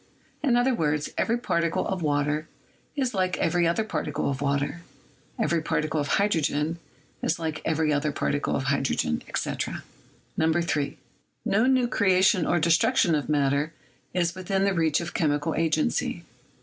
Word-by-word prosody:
In 270 Hz, -5 st, +2 dB
other 245 Hz, +2 st, +3 dB
words, 150 Hz, -7 st, 0 dB
every 230 Hz, -, +1 dB
particle 170 Hz, -8 st, 0 dB
of 190 Hz, -2 st, -2 dB
water 150 Hz, 0 st, 0 dB, 0.5 s
is 260 Hz, -4 st, -1 dB
like 185 Hz, -2 st, 0 dB
every 170 Hz, 0 st, +2 dB
other 170 Hz, +6 st, +1 dB
particle 150 Hz, -9 st, -2 dB
of 135 Hz, 0 st, -4 dB
water, 140 Hz, +3 st, -1 dB, 0.6 s
every 170 Hz, -1 st, +1 dB
particle 155 Hz, 0 st, -1 dB
of 145 Hz, -, -3 dB
hydrogen 165 Hz, -4 st, 0 dB, 0.4 s
is 160 Hz, -, 0 dB
like 160 Hz, -2 st, -4 dB
every 160 Hz, -1 st, +1 dB
other 145 Hz, +1 st, 0 dB
particle 145 Hz, 0 st, -1 dB
of 135 Hz, -, -1 dB
hydrogen, 135 Hz, -, 0 dB
etc. -, -, -3 dB, 0.6 s
3. 160 Hz, -3 st, 0 dB, 0.5 s
No 220 Hz, +5 st, +3 dB
new 260 Hz, -2 st, +3 dB
creation 190 Hz, -4 st, +3 dB
or 175 Hz, -, +2 dB
destruction 165 Hz, +1 st, +3 dB
of 150 Hz, -1 st, -1 dB
matter 145 Hz, +1 st, +1 dB, 0.4 s
is 175 Hz, -2 st, 0 dB
within 190 Hz, +1 st, -1 dB
the 200 Hz, 0 st, +2 dB
reach 160 Hz, -2 st, +2 dB
of 170 Hz, -, -6 dB
chemical 150 Hz, 0 st, 0 dB
agency. 155 Hz, -, 0 dB
160 Hz, 150 wpm, -26 LUFS, 150-185 Hz, 0.6 s, other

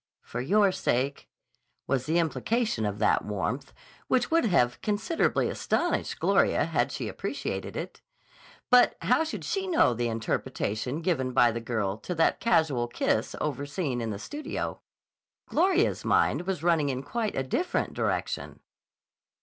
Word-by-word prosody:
"For 120 Hz, -, -5 dB
your 200 Hz, +8 st, +3 dB
sake" 135 Hz, -4 st, -1 dB, 0.6 s
was 130 Hz, -1 st, -1 dB
the 160 Hz, +2 st, +2 dB
implication 170 Hz, -, 0 dB
of 100 Hz, 0 st, -3 dB
that 105 Hz, -, +2 dB
warmth, 105 Hz, +6 st, -3 dB, 0.4 s
which 250 Hz, +2 st, +1 dB
would 330 Hz, -5 st, +3 dB
have 125 Hz, -, +2 dB
considerably 215 Hz, -, +1 dB
astonished -, -, -1 dB
Gloria -, -, +3 dB
had -, -, 0 dB
she -, -, -4 dB
appreciated -, -, -4 dB
it. -, -, -6 dB, 0.7 s
But 250 Hz, 0 st, +6 dB
how 250 Hz, +6 st, +3 dB
should 320 Hz, -, -5 dB
she 385 Hz, -1 st, -2 dB
know 320 Hz, -, +4 dB
the 120 Hz, +1 st, -1 dB
interpretation 115 Hz, +3 st, -2 dB
given 130 Hz, -7 st, 0 dB
by 120 Hz, -2 st, +5 dB
the 115 Hz, +1 st, -4 dB
girl 110 Hz, -4 st, -2 dB
to 180 Hz, +10 st, -5 dB
that 165 Hz, -, +2 dB
casual 150 Hz, -, +2 dB
kiss 120 Hz, -, 0 dB
overseen 145 Hz, -2 st, -2 dB
in 115 Hz, -, -2 dB
the 105 Hz, -, -3 dB
studio? 295 Hz, -, -5 dB, 0.6 s
Gloria's 375 Hz, +4 st, +2 dB
mind 180 Hz, -, +2 dB
was 185 Hz, -5 st, -2 dB
running 165 Hz, -4 st, +3 dB
in 130 Hz, 0 st, -3 dB
quite 220 Hz, -, -2 dB
a 135 Hz, -, 0 dB
different 325 Hz, -, -1 dB
direction. -, -, -2 dB
145 Hz, 145 wpm, -28 LUFS, -, 0.7 s, But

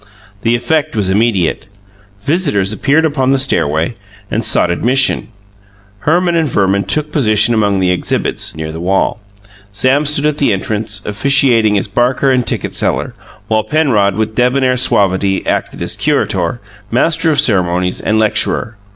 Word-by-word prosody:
The 115 Hz, +2 st, +1 dB
effect 145 Hz, +4 st, -1 dB
was 100 Hz, -3 st, 0 dB
immediate. 100 Hz, -4 st, 0 dB, 0.6 s
Visitors 125 Hz, -, 0 dB
appeared 150 Hz, +8 st, +1 dB
upon 140 Hz, -4 st, 0 dB
the 135 Hz, -, +3 dB
stairway 80 Hz, -, 0 dB, 0.4 s
and 115 Hz, -, -1 dB
sought 90 Hz, -, +3 dB
admission. 125 Hz, +9 st, +1 dB, 0.7 s
Herman 175 Hz, -, +1 dB
and 160 Hz, -3 st, +1 dB
Verman 100 Hz, -3 st, +1 dB
took 150 Hz, +8 st, 0 dB
position 110 Hz, -4 st, +2 dB
among 100 Hz, -3 st, +1 dB
the 90 Hz, -1 st, +1 dB
exhibits, 90 Hz, -, -2 dB
near 80 Hz, 0 st, -5 dB
the 80 Hz, -, -7 dB
wall; 95 Hz, +6 st, -1 dB, 0.5 s
Sam 130 Hz, +8 st, +1 dB
stood 150 Hz, 0 st, +2 dB
at 150 Hz, -1 st, 0 dB
the 135 Hz, -7 st, +2 dB
entrance, 105 Hz, +1 st, -4 dB
officiating 115 Hz, -1 st, +3 dB
as 100 Hz, -, -2 dB
barker 125 Hz, +6 st, +1 dB
and 125 Hz, -2 st, 0 dB
ticket -, -, -2 dB
seller; -, -, -2 dB, 0.3 s
while 110 Hz, 0 st, +1 dB
Penrod, 110 Hz, -8 st, +1 dB
with 110 Hz, 0 st, -2 dB
debonair 125 Hz, +2 st, +1 dB
suavity, 100 Hz, -6 st, +1 dB
acted -, -, -2 dB
as -, -, -3 dB
curator, 90 Hz, +5 st, -1 dB, 0.3 s
master 165 Hz, +7 st, +1 dB
of 150 Hz, -3 st, +1 dB
ceremonies, 90 Hz, -8 st, 0 dB
and 110 Hz, -, 0 dB
lecturer. 110 Hz, 0 st, 0 dB
110 Hz, 150 wpm, -14 LUFS, 100-135 Hz, 0.7 s, the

